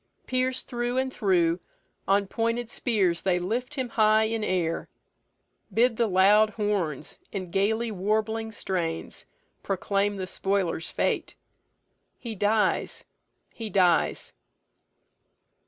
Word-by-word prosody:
Pierc'd 255 Hz, 0 st, 0 dB
through 240 Hz, +1 st, -2 dB
and 260 Hz, 0 st, 0 dB
through, 175 Hz, -4 st, +2 dB, 0.5 s
On 200 Hz, +1 st, +3 dB
pointed 230 Hz, +3 st, -2 dB
spears 190 Hz, -8 st, +1 dB
they 185 Hz, -2 st, +2 dB
lift 235 Hz, +10 st, -3 dB
him 260 Hz, -3 st, -2 dB
high 215 Hz, -1 st, +4 dB
in 220 Hz, 0 st, -1 dB
air; 175 Hz, -5 st, -1 dB, 0.8 s
Bid 235 Hz, 0 st, +3 dB
the 235 Hz, -, +2 dB
loud 205 Hz, +3 st, +5 dB
horns, 200 Hz, -, -2 dB
in 185 Hz, -4 st, -5 dB
gaily 220 Hz, +5 st, +1 dB
warbling 220 Hz, +3 st, -1 dB
strains, 175 Hz, -6 st, -3 dB, 0.3 s
Proclaim 200 Hz, +1 st, 0 dB
the 190 Hz, -1 st, -4 dB
spoiler's 185 Hz, -3 st, -1 dB
fate: -, -, -1 dB, 0.8 s
he 230 Hz, -2 st, -6 dB
dies, 210 Hz, +1 st, +1 dB, 0.5 s
he 225 Hz, -2 st, -5 dB
dies." 180 Hz, -3 st, +2 dB
210 Hz, 110 wpm, -27 LUFS, 185-225 Hz, 0.8 s, loud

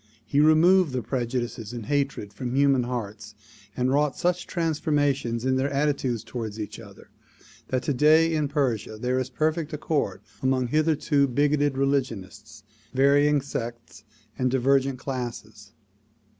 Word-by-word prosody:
He 140 Hz, -, 0 dB
removed 160 Hz, +1 st, +5 dB
the 125 Hz, -2 st, -2 dB
prejudices 120 Hz, -3 st, -3 dB
and 120 Hz, -3 st, -6 dB
hatred 140 Hz, -7 st, -2 dB
from 125 Hz, -1 st, -4 dB
human 135 Hz, -3 st, +3 dB
hearts 105 Hz, -4 st, -6 dB, 0.4 s
and 125 Hz, +1 st, +1 dB
wrought 145 Hz, 0 st, +1 dB
such 180 Hz, 0 st, 0 dB
transformation 145 Hz, -7 st, 0 dB
in 130 Hz, 0 st, +2 dB
their 135 Hz, +2 st, 0 dB
attitudes 140 Hz, -5 st, -1 dB
toward 110 Hz, -4 st, -6 dB
each 105 Hz, -2 st, -6 dB
other -, -, -14 dB, 0.6 s
that 130 Hz, -1 st, -1 dB
today 155 Hz, +4 st, +4 dB
in 155 Hz, -2 st, 0 dB
Persia 125 Hz, -7 st, -1 dB
there 125 Hz, +3 st, -1 dB
is 130 Hz, -1 st, -3 dB
perfect 155 Hz, +3 st, -1 dB
accord 150 Hz, 0 st, -2 dB, 0.2 s
among 130 Hz, -2 st, +1 dB
hitherto 150 Hz, -1 st, +2 dB
bigoted 145 Hz, +1 st, +1 dB
religionists, 110 Hz, -6 st, -2 dB, 0.3 s
varying 145 Hz, +2 st, +4 dB
sects 115 Hz, -4 st, -7 dB, 0.4 s
and 130 Hz, 0 st, +2 dB
divergent 135 Hz, +1 st, +2 dB
classes. 115 Hz, -6 st, -6 dB
135 Hz, 130 wpm, -25 LUFS, 120-145 Hz, 0.6 s, removed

